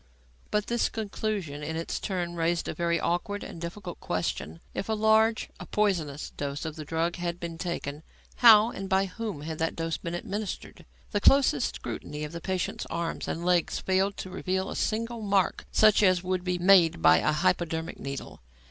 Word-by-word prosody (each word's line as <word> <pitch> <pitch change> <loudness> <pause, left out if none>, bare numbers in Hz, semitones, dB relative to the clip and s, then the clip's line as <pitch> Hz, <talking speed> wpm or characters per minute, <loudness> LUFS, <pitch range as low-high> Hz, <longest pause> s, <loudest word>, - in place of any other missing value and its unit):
But 210 -1 0
this 235 0 +1
conclusion 205 -8 -3
in 160 +2 -4
its 165 +1 -3
turn 175 -3 -2
raised 170 0 0
a - - -2
very 170 -1 0
awkward 205 +5 -1
and 165 - -8
difficult 175 +1 -6
question. 85 -2 -3
If 200 - -4
a - - +2
large 220 +1 +3
a - - -8
poisonous 170 -9 0
dose 145 +2 -4
of 155 -1 -4
the 155 - -6
drug 165 +3 -1
had 175 0 -3
been 165 -1 -6
taken, 160 -4 -4 0.4
how, 225 -1 +8
and 195 0 -6
by 190 0 +3
whom 195 -4 -5
had 155 +1 -5
that 165 0 0
dose 165 0 -2
been 170 0 -5
administered? 205 +3 -5 0.2
The 205 - 0
closest 275 +3 +4
scrutiny 150 +1 -6
of 150 - -5
the 170 0 -7
patient's 185 -1 -2
arms 170 0 -3
and 170 +1 -3
legs 180 -2 +2
failed 190 +1 +1
to 185 - -6
reveal 190 +1 -2
a - - -5
single 230 +1 -1
mark 200 -3 +1
such 215 -1 +5
as 185 -3 +4
would 185 -1 -1
be 180 -1 0
made 175 - +5
by 80 0 +7
a 120 - +2
hypodermic 165 0 0
needle. 140 - -6
175 Hz, 185 wpm, -28 LUFS, 165-205 Hz, 0.4 s, how